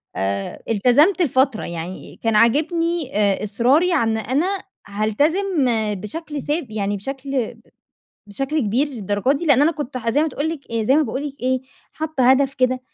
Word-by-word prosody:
آآ، 100 0 -3
التزمت 255 - +4
لفترة. 265 -5 +2
يعني 170 +2 -7
كان 225 -1 +1
عاجبني 315 - +1
آآ، 200 -1 +2
إصراري 255 - +2
عن 225 -7 +1
أنا 260 - 0 0.4
هالتزم 290 - +1 0.3
بشكل 295 - -6
ثاب 295 -6 -2
يعني 205 -1 -2
بشكل 270 +2 -3 0.7
بشكل 270 +9 -2
كبير 240 +6 +1
للدرجة 220 -1 -1
دي، 320 +4 -3
لأن 285 -1 +5
أنا 325 - +4
كنت 290 -5 -6
ح 230 -2 -1
زي 290 +6 +2
ما 320 - +1
تقول 290 +3 -3
لِك 325 -3 -4
زي 230 +3 +2
ما 310 - +4
باقول 290 0 -3
لِك 275 - -13
إيه 255 0 0 0.3
حاطة 300 -5 +1
هدف 270 0 +3
كده 255 0 +1
260 Hz, 160 wpm, -21 LUFS, 220-300 Hz, 0.7 s, لأن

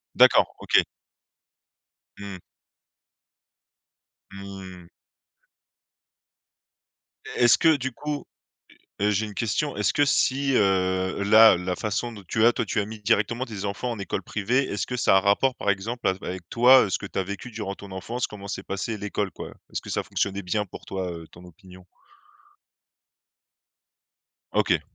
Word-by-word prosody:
D'accord, - - +5
OK. - - +3 1.4
Mmh. 100 -3 -8 1.9
Mmh. 95 -3 -10 2.5
Est - - +1
est-ce 120 - +6
que 160 -1 +5
du 135 -1 -3
coup 145 +3 -5 0.8
heu 100 - +1
heu, - - +3
j'ai 105 +2 0
une 105 - -9
question, 120 +5 -1
est-ce 100 -4 +1
que 145 - +3
si, 135 0 +1
heu, 95 -1 +1
là, 110 0 +8
la 90 +1 -3
façon 110 +3 -2
dont 105 - -11
tu 110 - +2
as 120 - +6
toi, - - -2
tu - - -3
as 100 - -2
mis 110 0 -9
directement 110 +5 +1
tes 105 -5 -7
enfants 105 +5 -3
en 115 - -4
école 100 0 -3
privée, 120 +9 0
est-ce 100 - -2
que 125 - -4
ça 110 - +3
a 95 - +7
un - - +2
rapport 105 +7 +2
par 100 - 0
exemple 115 +5 -3
avec 95 -2 -4
toi, 125 +2 +6
heu, 100 - -4
ce - - 0
que 100 - -7
tu - - -5
as - - +2
vécu 100 +6 -7
durant 105 -3 -5
ton 100 -1 -12
enfance, 115 +7 -3
comment 100 -1 -10
s'est 95 - -4
passée 100 +4 -4
l'école, 105 0 -3
quoi? - - -8 0.2
Est-ce - - -3
que - - -10
ça - - -1
fonctionnait 100 0 -2
bien 105 +3 -1
pour 90 - -11
toi, 95 -2 -4
heu, 85 -1 -8
ton 85 - -15
opinion? 90 +1 -15 2.7
OK. - - +2
100 Hz, 165 wpm, -25 LUFS, 95-115 Hz, 2.7 s, là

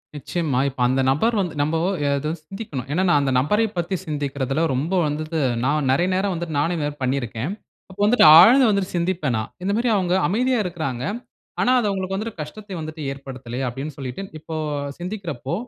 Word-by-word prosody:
நிச்சயமா. 145 -2 -2
இப்ப 130 - -14
அந்த 130 +1 +1
நபர் 225 - +1
வந்து 175 -5 -2
நம்போ 155 +3 +1 0.4
அதா 150 +2 -2
சிந்திக்கணும். 155 - -6
ஏன்னா, 180 +5 +1
நான் 145 -3 +4
அந்த 135 -1 0
நபரைப் 210 +9 +1
பத்தி 175 +3 -1
சிந்திக்கிறதுல 140 -1 -2
ரொம்ப 150 +9 -1
வந்துது 155 +2 -3 0.3
நான் 145 -1 +1
நெறைய 175 +7 +2
நேரம் 190 +1 0
வந்துட்டு, 170 -3 -4
நானே 165 +4 +1
இதுமாரி 145 -1 -2
பண்ணியிருக்கேன். 130 - -2 0.4
அப்போ 190 +1 -14
வந்துட்டு 240 -2 +5
ஆழ்ந்து 245 +8 +7
வந்துட்டு 200 -3 0
சிந்திப்பேன் 170 -8 0
நான். 110 - -4
இந்த 200 - 0
மாரி 235 +2 +1
அவங்க 180 -2 +1
அமைதியா 245 +5 +1
இருக்குறாங்க. 155 -9 -4 0.6
ஆனா 250 - +3
அது 215 - 0
அவங்களுக்கு 190 -1 -2
வந்துட்டு 215 -2 -5
கஷ்டத்தை 200 +6 -8
வந்துட்டு 155 0 -7
ஏற்படுத்தல்லையே! 135 -2 -6
அப்டின்னு 135 +4 -5
சொல்லிட்டு, 135 +7 -5 0.2
இப்போ 160 +1 -7 0.4
சிந்திக்கிறப்போ, 175 - -5
160 Hz, 170 wpm, -22 LUFS, 140-190 Hz, 0.6 s, ஆழ்ந்து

